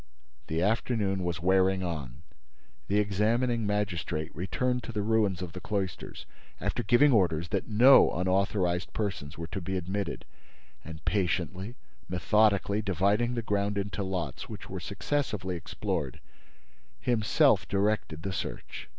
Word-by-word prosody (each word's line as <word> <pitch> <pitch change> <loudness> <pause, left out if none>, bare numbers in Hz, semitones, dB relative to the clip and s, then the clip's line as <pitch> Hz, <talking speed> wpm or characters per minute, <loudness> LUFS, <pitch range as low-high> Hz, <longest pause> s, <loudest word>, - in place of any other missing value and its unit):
The 80 +2 0
afternoon 105 -3 0
was 85 -1 -2
wearing 95 0 +3
on. 75 -5 -5 0.6
The 100 - +1
examining 110 +3 +1
magistrate 85 -6 -2
returned 125 +8 -1
to - - -6
the 105 -3 -2
ruins 105 -4 +1
of 85 -2 -7
the 90 - -6
cloisters, 100 -4 -4 0.3
after - - -1
giving 120 +8 +5
orders 85 -7 +2
that - - -1
no 120 +5 +7
unauthorized 90 -1 0
persons 90 -9 -3
were 85 - -4
to 90 +4 -5
be 95 +2 -2
admitted, 95 +1 -3 0.6
and 80 -1 -10
patiently, 95 +3 -1 0.3
methodically, 100 +2 +2
dividing 100 +5 +1
the 115 - -2
ground 100 -1 0
into 100 +1 -2
lots 95 -4 -4
which - - -9
were - - -4
successively 105 -11 -2
explored, 85 - -3 0.8
himself 115 - +3
directed 100 -5 0
the 95 - -3
search. - - -6
100 Hz, 135 wpm, -29 LUFS, 90-105 Hz, 0.8 s, no